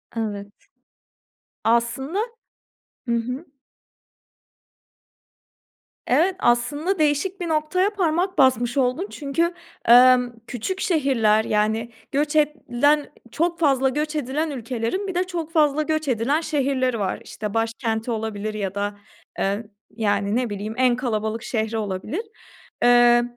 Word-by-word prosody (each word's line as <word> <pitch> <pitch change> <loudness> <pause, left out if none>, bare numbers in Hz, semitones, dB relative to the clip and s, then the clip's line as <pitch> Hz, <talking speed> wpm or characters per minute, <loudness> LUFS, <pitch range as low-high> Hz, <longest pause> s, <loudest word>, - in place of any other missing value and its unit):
Evet. 205 -3 -3 1.2
Aslında 235 - +1 0.9
Hı 235 - +2
hı. 250 +7 -3 2.6
Evet. 335 +9 +2
Aslında 295 +9 +1
değişik 310 +6 +1
bir 345 - -2
noktaya 320 +5 +1
parmak 370 -2 0
basmış 245 -2 +3
oldun 265 +9 +1
çünkü, 330 +4 -1 0.3
emm, 250 0 +7 0.2
küçük 265 - -4
şehirler, 260 - +2
yani, 220 +2 0 0.2
göç 295 +2 0
edilen 295 -1 +2 0.2
çok 340 +1 -1
fazla 270 -4 +3
göç 300 +3 -2
edilen 300 +3 -1
ülkelerin 250 - -3
bir 375 - -4
de 360 - +2
çok 340 -3 -5
fazla 305 -2 +3
göç 310 -1 -1
edilen 255 +6 +1
şehirleri 265 -6 0
var. 190 -2 -2
İşte, 210 -1 -6
başkenti 225 0 -1
olabilir 215 -1 -3
ya 200 -2 -3
da, 205 0 -2 0.4
eee, 200 +3 0 0.3
yani, 205 -1 0
ne 245 -2 0
bileyim, 205 +2 -4
en 255 -1 +4
kalabalık 225 -2 -2
şehri 225 -2 -2
olabilir. 210 - -3 0.6
Eee, 240 0 +6
255 Hz, 120 wpm, -23 LUFS, 225-310 Hz, 2.6 s, emm